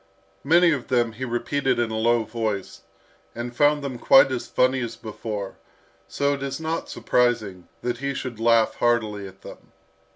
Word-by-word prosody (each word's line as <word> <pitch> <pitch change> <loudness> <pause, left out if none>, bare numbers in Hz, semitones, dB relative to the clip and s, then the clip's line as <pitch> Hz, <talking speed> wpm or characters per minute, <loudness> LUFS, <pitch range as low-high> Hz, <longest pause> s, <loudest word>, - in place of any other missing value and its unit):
Many 170 +4 +5
of 140 -6 -2
them 120 -3 +1
he 125 +4 -6
repeated 130 +3 -1
in 120 -2 0
a - - -3
low 115 +1 +2
voice, 110 -3 -4 0.5
and 120 +1 -6
found 145 +2 +3
them 130 -3 -5
quite 135 +2 +6
as 130 - -3
funny 130 +1 +2
as 115 -1 -4
before; 105 -3 -6 0.5
so 140 0 0
it 140 - -5
is 135 +1 -4
not 160 +1 -3
surprising 110 -7 0 0.2
that 120 -1 -2
he 140 0 -3
should 125 -4 -5
laugh 115 -1 +3
heartily 110 -4 0
at 95 +1 -15
them. - - -13
120 Hz, 170 wpm, -24 LUFS, 110-135 Hz, 0.5 s, quite